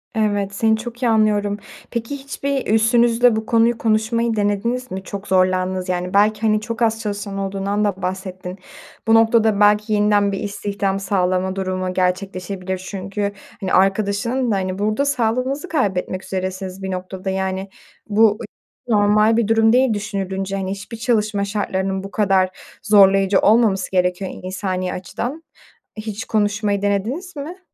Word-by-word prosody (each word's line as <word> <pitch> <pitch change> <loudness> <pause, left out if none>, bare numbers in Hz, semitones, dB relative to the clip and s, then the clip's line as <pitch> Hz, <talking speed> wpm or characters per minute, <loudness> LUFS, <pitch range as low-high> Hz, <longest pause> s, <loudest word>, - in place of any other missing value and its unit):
Evet, 205 -2 0
seni 220 +1 +2
çok 240 +2 -8
iyi 235 - +3
anlıyorum. 210 -2 +2 0.3
Peki, 235 +4 -3
hiçbir 275 0 -3
üstünüzle 235 +1 +4
bu 220 0 -2
konuyu 230 0 +3
konuşmayı 225 +1 +1
denediniz 220 +5 -1
mi? 190 +1 -5
Çok 200 +1 -7
zorlandığınızı 185 0 +1
yani. 180 +1 -3
Belki, 210 +1 +3
hani, 215 -1 +2
çok 230 +2 -5
az 225 -1 +2
çalışan 200 -1 -4
olduğundan 195 +1 -1
da 195 -2 -2
bahsettin. 185 0 -5 0.5
Bu 225 - +5
noktada 225 -2 +4
belki 210 +1 +4
yeniden 205 -1 +3
bir 195 - -3
istihdam 200 -1 -2
sağlama 185 -1 0
durumu 185 -1 -2
gerçekleşebilir 185 0 -2
çünkü, 200 +1 -3 0.3
hani, 185 - -2
arkadaşının 210 +6 +1
da... - - +2
Hani, 185 0 -2
burada 215 +7 +1
sağlığınızı 255 +5 0
kaybetmek 190 - -1
üzeresiniz 190 0 -4
bir 190 - -3
noktada 185 +1 -5
yani. 190 0 -2 0.4
Bu 215 0 +4
hiç - - -8 0.4
normal 210 +1 +4
bir 230 -3 +2
durum 225 0 +4
değil 255 -2 +4
düşünülünce, 195 -2 -3
hani, 190 -1 -3
hiçbir 200 +3 -7
çalışma 215 -3 0
şartlarının 195 -2 -2
bu 195 - -8
kadar 195 -3 +2 0.3
zorlayıcı 195 -2 +5
olmaması 210 -3 +3
gerekiyor 180 +1 0
insani 185 -1 -3
açıdan. 245 - -5 0.5
Hiç 215 +2 -5
konuşmayı 205 -1 0
denediniz 235 - -2
mi? 320 +7 -7
205 Hz, 145 wpm, -20 LUFS, 190-225 Hz, 0.5 s, Bu